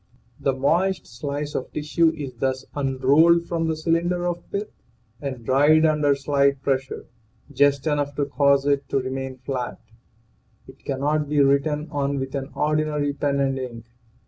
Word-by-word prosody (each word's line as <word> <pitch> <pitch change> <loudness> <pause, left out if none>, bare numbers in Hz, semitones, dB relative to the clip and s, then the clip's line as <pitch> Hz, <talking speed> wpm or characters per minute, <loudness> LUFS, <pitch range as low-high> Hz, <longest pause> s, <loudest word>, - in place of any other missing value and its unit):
The 135 - +1
moist 175 +8 +1
slice 145 +5 -5
of - - -4
tissue 160 +2 +2
is 140 -4 -6
thus 130 +2 -2
unrolled 145 +5 +3
from 165 -1 -1
the 160 - 0
cylinder 170 +2 0
of 175 0 -2
pith 205 +1 -3 0.5
and 130 -5 -5
dried 145 +5 +4
under 150 -2 +3
slight 140 0 +1
pressure 135 -1 -2 0.5
just 140 0 +2
enough 145 -2 -1
to 145 - 0
cause 140 -1 +2
it 140 -1 0
to 135 - +1
remain 130 0 -4
flat. 125 -1 -4 0.9
It 130 +1 -16
cannot 145 +2 -1
be 150 -1 +1
written 140 +2 +2
on 140 -1 -1
with 135 0 -4
an 135 0 -4
ordinary 150 -1 0
pen 140 0 -1
and 135 -1 0
ink. 120 -3 -7
140 Hz, 155 wpm, -23 LUFS, 135-150 Hz, 0.9 s, dried